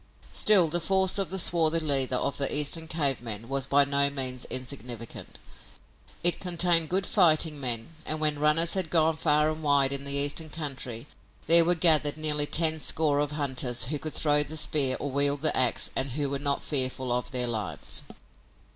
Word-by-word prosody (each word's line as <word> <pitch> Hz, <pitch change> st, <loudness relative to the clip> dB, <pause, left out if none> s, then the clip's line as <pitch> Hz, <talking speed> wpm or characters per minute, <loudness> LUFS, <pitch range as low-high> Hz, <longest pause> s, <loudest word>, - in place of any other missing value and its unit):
Still, 195 Hz, -5 st, +5 dB
the 170 Hz, +3 st, -1 dB
force 190 Hz, +2 st, +1 dB
of 195 Hz, -, -1 dB
the 190 Hz, -, -3 dB
swarthy 165 Hz, -2 st, +2 dB
leader 135 Hz, -5 st, -1 dB
of 140 Hz, +3 st, -3 dB
the 140 Hz, -, 0 dB
Eastern 150 Hz, +2 st, +1 dB
cave 145 Hz, -6 st, -2 dB
men 115 Hz, -1 st, -7 dB
was 135 Hz, 0 st, -3 dB
by 140 Hz, 0 st, +3 dB
no 140 Hz, 0 st, +1 dB
means 130 Hz, -3 st, -3 dB
insignificant. 125 Hz, -3 st, -7 dB, 0.9 s
It 175 Hz, 0 st, +2 dB
contained 175 Hz, -2 st, 0 dB
good 190 Hz, +1 st, +1 dB
fighting 160 Hz, -6 st, +2 dB
men, 120 Hz, -1 st, -4 dB
and, 155 Hz, -, -3 dB
when 150 Hz, -1 st, +1 dB
runners 155 Hz, +3 st, +2 dB
had 185 Hz, -4 st, -2 dB
gone 160 Hz, -1 st, +2 dB
far 150 Hz, -1 st, 0 dB
and 155 Hz, 0 st, -8 dB
wide 140 Hz, -2 st, +2 dB
in 140 Hz, 0 st, -5 dB
the 140 Hz, 0 st, -3 dB
Eastern 145 Hz, +3 st, +1 dB
country, 135 Hz, -6 st, -7 dB, 0.4 s
there 170 Hz, +1 st, +8 dB
were 175 Hz, +1 st, +3 dB
gathered 155 Hz, -3 st, +3 dB
nearly 150 Hz, -1 st, -1 dB
ten 160 Hz, 0 st, +3 dB
score 150 Hz, -1 st, 0 dB
of 145 Hz, 0 st, -3 dB
hunters 130 Hz, -5 st, -2 dB
who 150 Hz, -1 st, -3 dB
could 155 Hz, +1 st, -7 dB
throw 150 Hz, -1 st, +3 dB
the 150 Hz, +2 st, -4 dB
spear 140 Hz, -4 st, +2 dB
or 145 Hz, -, -6 dB
wield 140 Hz, +1 st, +1 dB
the 155 Hz, -, +2 dB
ax 130 Hz, -2 st, 0 dB
and 135 Hz, -1 st, -3 dB
who 145 Hz, 0 st, -3 dB
were 140 Hz, -, -4 dB
not 140 Hz, 0 st, -2 dB
fearful 130 Hz, -3 st, -1 dB
of 125 Hz, 0 st, -3 dB
their 125 Hz, -2 st, +1 dB
lives. 110 Hz, -5 st, -4 dB
145 Hz, 190 wpm, -25 LUFS, 135-160 Hz, 0.9 s, there